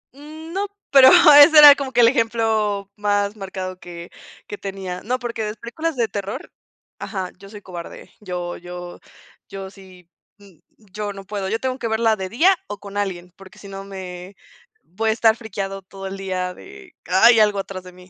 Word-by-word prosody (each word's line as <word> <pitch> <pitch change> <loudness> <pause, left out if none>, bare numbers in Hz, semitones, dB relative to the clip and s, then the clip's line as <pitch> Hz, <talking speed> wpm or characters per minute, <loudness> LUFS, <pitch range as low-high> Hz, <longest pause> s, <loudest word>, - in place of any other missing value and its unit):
Mm, 310 +3 -11
no, 395 +2 -2 0.2
pero 270 -2 +8 0.3
ese 315 +1 +5
era 295 -1 +11
como 275 -2 -5
que 240 -1 +3
el 230 - +7
ejemplo 220 -4 0
más 205 0 -1
marcado 190 -2 -7
que 170 -1 -11 0.4
que 205 - -8
tenía. 190 -2 -6
No, 250 +3 -2
porque 235 -3 -5
las 210 +1 -5
películas 315 +9 -4
de 235 -3 0
terror 200 -1 -6 0.5
ajá, 190 -3 -5
yo 195 - -13
soy 205 0 -11
cobarde, 175 -2 -10
yo 180 -3 -5
yo 175 0 -9 0.5
yo 195 -1 -8
sí 185 -3 -17 0.3
y 200 -5 -21
yo 210 0 -7
no 195 0 -10
puedo. 195 -1 -4
Yo 225 +2 -1
tengo 260 +1 -3
que 230 - -3
verla 220 0 +1
de 190 -2 -6
día 340 - +3
o 205 - -6
con 200 0 -11
alguien, 180 -3 -4
porque 195 -1 -16
si 200 - -13
no 195 0 -8
me 185 -1 -9 0.5
voy 220 +6 -3
a - - +3
estar 225 0 +3
friqueado 195 -3 -6
todo 195 +1 -11
el 195 0 -6
día 185 -1 -4
de: 405 - -15
"Hay 225 +6 +5
algo 210 -1 +3
atrás 195 -1 -6
de 180 - -12
mí", 180 0 -17
200 Hz, 190 wpm, -21 LUFS, 190-230 Hz, 0.5 s, era